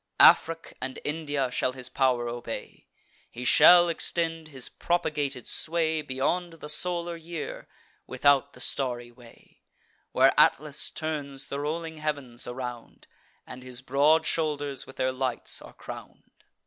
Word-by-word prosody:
Afric 165 0 +5
and 130 0 -4
India 145 -4 -1
shall 130 +1 0
his 130 -1 -5
pow'r 125 -3 +1
obey; 120 0 -6 0.4
He 125 +1 -7
shall 175 +6 +8
extend 165 -1 -1
his 135 -4 -6
propagated 145 -7 -1
sway 160 -1 +1
Beyond 150 +6 -1
the 150 -2 -9
solar 170 +2 -1
year, 165 -1 -7 0.4
without 140 +1 +3
the - - -11
starry 120 -3 -1
way, 120 -1 -19 0.5
Where - - +5
Atlas 150 0 +3
turns 145 -4 -4
the 140 - -3
rolling 160 +2 -3
heav'ns 140 -6 -3
around, 125 -1 -7 0.4
And 125 - -10
his 130 0 -6
broad 145 +5 +3
shoulders 145 -4 -1
with 135 - -12
their 130 0 0
lights 130 -2 -3
are - - -12
crown'd. - - -10
145 Hz, 135 wpm, -27 LUFS, 130-160 Hz, 0.5 s, shall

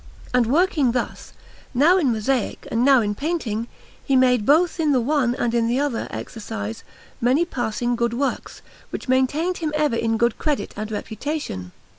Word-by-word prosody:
And 250 -2 +3
working 295 -3 +2
thus, 245 -2 -4 0.4
now 320 +9 +5
in 280 -8 +2
mosaic 230 +2 -1
and 230 +1 +1
now 270 -2 +6
in 205 -1 -1
painting, 235 -5 -2 0.4
he 275 - +1
made 250 -4 +3
both 330 +4 +3
in 305 -3 +2
the 260 - +3
one 250 -1 +1
and 235 -2 -1
in 230 -1 +2
the 245 +3 +1
other 285 -5 -1
exercise 110 - -6 0.4
many 260 +8 +3
passing 240 -5 -2
good 235 0 0
works, 275 +2 -3 0.3
which - - -6
maintained 285 +8 +1
him 315 -3 -2
ever 300 -5 +1
in 225 -1 0
good 235 0 +1
credit 300 -3 -1
and 215 +1 -5
reputation. 215 - -4
250 Hz, 170 wpm, -22 LUFS, 230-295 Hz, 0.4 s, now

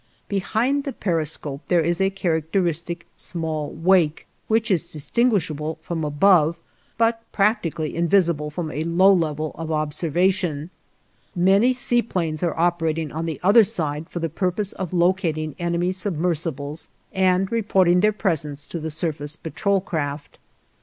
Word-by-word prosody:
Behind 230 +8 0
the 275 - -4
periscope, 155 -5 -3
there 175 -2 +3
is 170 +3 0
a 195 - +3
characteristic 170 -1 -1
small 160 -3 -4
wake, 165 -2 +2 0.2
which 225 0 +1
is 170 -2 +1
distinguishable 160 - 0
from 165 -2 -3
above, 160 +2 +3 0.4
but 230 0 +2
practically 180 -7 0
invisible 170 -3 +2
from 155 +1 -4
a 155 - -3
low 180 +4 +5
level 155 -3 -1
of 160 0 -6
observation. 160 +1 0 0.6
Many 195 +7 +4
sea 245 -1 +1
planes 165 -8 -2
are 170 -2 -1
operating 165 -3 0
on 160 +2 -3
the 160 - -4
other 205 +5 +7
side 160 -7 +1
for - - -7
the 165 -1 -1
purpose 185 +5 -2
of 185 -4 -5
locating 170 -4 0
enemy 170 +1 0
submersibles 165 -5 -2 0.2
and 190 0 +2
reporting 190 -6 +3
their 210 +3 +4
presence 155 -9 -2
to 170 - -6
the 160 0 -4
surface 155 -1 -3
patrol 195 +4 -1
craft. 145 -5 -4
170 Hz, 140 wpm, -23 LUFS, 155-190 Hz, 0.6 s, other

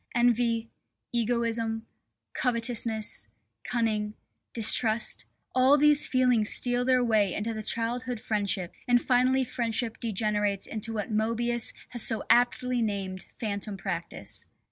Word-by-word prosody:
Envy, 235 -1 +2 0.5
egoism, 230 -1 0 0.5
covetousness, 230 - 0 0.4
cunning, 215 -3 -1 0.4
distrust, 225 0 +3 0.3
all 260 +3 +5
these 295 0 +5
feelings 250 -5 +2
steal 245 0 0
their 255 0 +3
way 215 -5 +2
into 225 +2 -2
the 220 - -5
childhood 240 +2 -2
friendship, 200 -5 -2
and 245 0 +4
finally 255 +1 +2
friendship 235 -2 -2
degenerates 210 -2 0
into 225 +1 -3
what 220 +1 -4
Moebius 230 +2 0 0.2
has 240 -2 -2
so 225 0 +2
aptly 245 0 +2
named 195 -3 -3
Phantom 205 -2 -3
practice. 170 -2 -4
230 Hz, 115 wpm, -28 LUFS, 215-245 Hz, 0.5 s, all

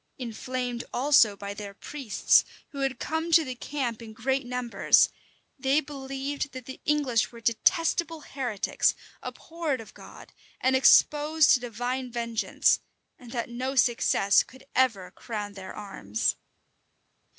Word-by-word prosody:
Inflamed 245 0 -4
also 245 -6 +4
by 200 0 -6
their 200 -1 -8
priests, 265 -2 +2 0.3
who 280 - -9
had 270 -1 -1
come 320 +2 -3
to 320 -1 +6
the 255 - -4
camp 245 -3 -4
in 220 -1 -10
great 260 +3 -1
numbers, 250 -1 +3 0.5
they 270 +3 +3
believed 275 -1 -5
that 255 -2 -8
the 260 - -9
English 285 -6 +1
were 235 - -11
detestable 325 +8 +1
heretics, 245 -8 -1 0.3
abhorred 325 -5 -4
of 225 - -11
God, - - -14 0.3
and 260 +1 +2
exposed 300 +3 +5
to - - +5
divine 245 +2 -4
vengeance; 235 -1 +1 0.4
and 245 -2 -12
that 235 -2 -3
no 255 +3 -3
success 230 -5 +3
could 260 0 -13
ever 220 -8 +1
crown 210 -1 -6
their 190 -1 -9
arms. 110 - -2
250 Hz, 135 wpm, -27 LUFS, 230-275 Hz, 0.5 s, to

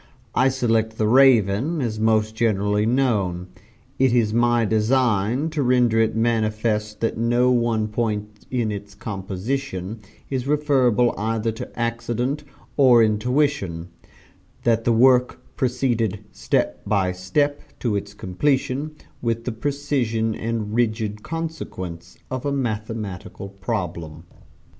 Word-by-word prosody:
I 130 - +4
select 115 -4 0
'The 110 - +1
Raven' 130 - +4
as 115 -5 -2
most 110 0 +2
generally 105 -1 +1
known. 100 -8 0 0.5
It 130 -2 +4
is 110 -3 +2
my 120 0 +3
design 115 +4 +1
to 155 -2 -1
render 125 -3 +3
it 110 -1 +2
manifest 110 -2 0
that 115 -1 -1
no 120 +2 +3
one 115 -3 +1
point 105 -1 -3
in 120 -4 -1
its 100 0 -7
composition 100 +2 -4 0.3
is 130 -1 -3
referable 130 -5 +3
either 110 +1 0
to 110 - -8
accident 120 +4 -2 0.3
or 125 -5 +6
intuition 110 - 0 0.7
that 115 -1 +2
the 120 - +3
work 125 +2 +4 0.2
proceeded 120 -5 0
step - - -1
by 100 -3 +1
step, 145 +12 0 0.2
to 115 -4 0
its 100 0 -4
completion, 140 +8 -1 0.3
with 115 -1 -1
the 125 - -2
precision 120 -3 -1
and 110 -1 -3
rigid 110 -2 0
consequence 150 - -6
of 130 -1 -3
a 145 - -1
mathematical 110 -7 -4
problem. 90 -6 -4
115 Hz, 120 wpm, -23 LUFS, 105-125 Hz, 0.7 s, or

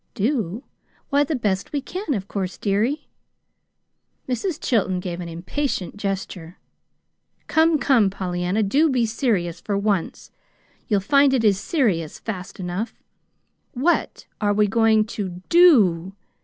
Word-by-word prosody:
"Do? 225 - -1 0.5
Why, 285 +1 +4
the 295 +2 -2
best 205 -6 -1
we 290 - -1
can, 330 +2 -4
of 195 -2 -4
course, 190 -3 -4
dearie." 225 +9 -1 1.2
Mrs. 265 - -2
Chilton 190 -6 0
gave 180 -1 -5
an 175 -1 -6
impatient 180 - -3
gesture. 195 -4 -5 0.9
"Come, 320 0 +3
come, 250 -8 +3
Pollyanna, 185 +2 -1
do 285 +11 +3
be 250 -4 +2
serious 215 - -1
for 200 -2 -2
once. 200 -4 -2 0.6
You'll 205 -4 +2
find 275 +5 +4
it 240 - +1
is 200 -3 +3
serious, 200 - 0
fast 190 -5 -7
enough. 185 +5 -5 0.7
WHAT 300 +7 0 0.2
are 205 -1 +2
we 210 0 +4
going 220 +1 +3
to 190 -5 -6
DO? 200 - +5
210 Hz, 130 wpm, -22 LUFS, 185-265 Hz, 1.2 s, DO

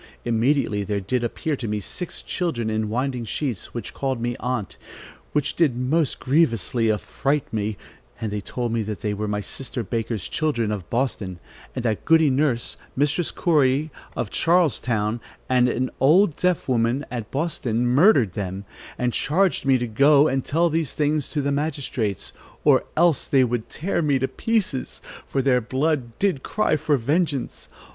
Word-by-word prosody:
Immediately 120 -2 +1
there 105 -1 -1
did 120 +6 -1
appear 150 +6 -2
to 125 -4 -5
me 105 0 -1
six 175 - -5
children 125 - -2
in 110 -1 -1
winding 125 +2 -1
sheets, 120 - -3
which 115 -4 -5
called 135 -3 -2
me 120 +1 -2
aunt, 125 -5 -3 0.6
which 150 -2 0
did 145 -8 +2
most 145 +4 0
grievously 120 - +2
affright 140 +7 -1
me; 105 -1 -1 0.4
and 110 -2 -3
they 105 0 -2
told 120 +3 -3
me 115 - +1
they 105 0 -3
were 105 +1 -3
my 105 0 -1
sister 120 +4 -4
Baker's 115 -2 -3
children 120 -9 0
of 100 -5 -5
Boston, 115 -7 -1 0.4
and 125 -2 -3
that 110 -3 0
Goody 160 -3 +5
Nurse, 130 -3 0 0.2
Mistress 145 +5 +1
Corey 150 -2 +2 0.2
of 105 - -3
Charlestown 120 -10 +1 0.3
and 125 -1 +3
an 130 +1 -1
old 160 +5 +5
deaf 180 -2 0
woman 125 +2 +1
at 115 -4 -4
Boston 130 -6 -1
murdered 130 - +4
them, 95 0 -4 0.3
and 125 -1 0
charged 180 0 +1
me 135 -1 +5
to 120 - -2
go 140 +6 +5
and 135 -2 0
tell 170 +2 +1
these 160 -3 -1
things 150 -1 0
to 145 -2 -2
the 140 - 0
magistrates, 140 - -2 0.3
or - - +4
else 165 -4 +3
they 135 -2 +4
would 120 -2 -2
tear 170 +2 -1
me 145 -4 +2
to 130 0 0
pieces, 205 - -1 0.3
for 135 - 0
their 125 -2 +3
blood 130 0 -1
did 190 -9 +1
cry 215 - +1
for 150 -1 +1
vengeance. 145 +2 -1
130 Hz, 165 wpm, -23 LUFS, 115-150 Hz, 0.6 s, Goody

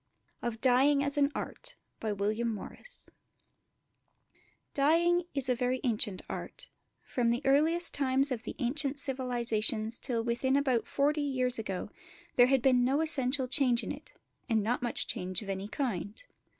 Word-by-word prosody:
OF 235 -2 -3
DYEING 270 +3 +4
AS 285 0 0
AN 285 0 +2
ART - - -4 3.0
Dyeing 340 +5 +4
is 270 -2 0
a 255 - +3
very 250 +1 -1
ancient 215 -5 -1
art; - - -5 0.3
from 240 -2 0
the 240 +4 0
earliest 320 +5 +3
times 270 0 +2
of 240 -3 -2
the - - -7
ancient 275 +3 -1
civilisations 235 -4 0
till 235 -4 -2
within 240 +3 0
about 260 -5 +1
forty 295 +2 +1
years 255 -4 +2
ago 195 -4 -4 0.4
there 245 0 +6
had 265 -2 +2
been 255 -2 +4
no 270 +5 +2
essential 265 -4 +1
change 250 -2 +1
in - - -4
it, - - -9 0.4
and 220 -2 +2
not 240 +5 0
much 240 - +1
change 185 +3 -3
of 200 - -9
any 195 +1 -3
kind. 215 - -4
255 Hz, 145 wpm, -30 LUFS, 235-280 Hz, 3.0 s, there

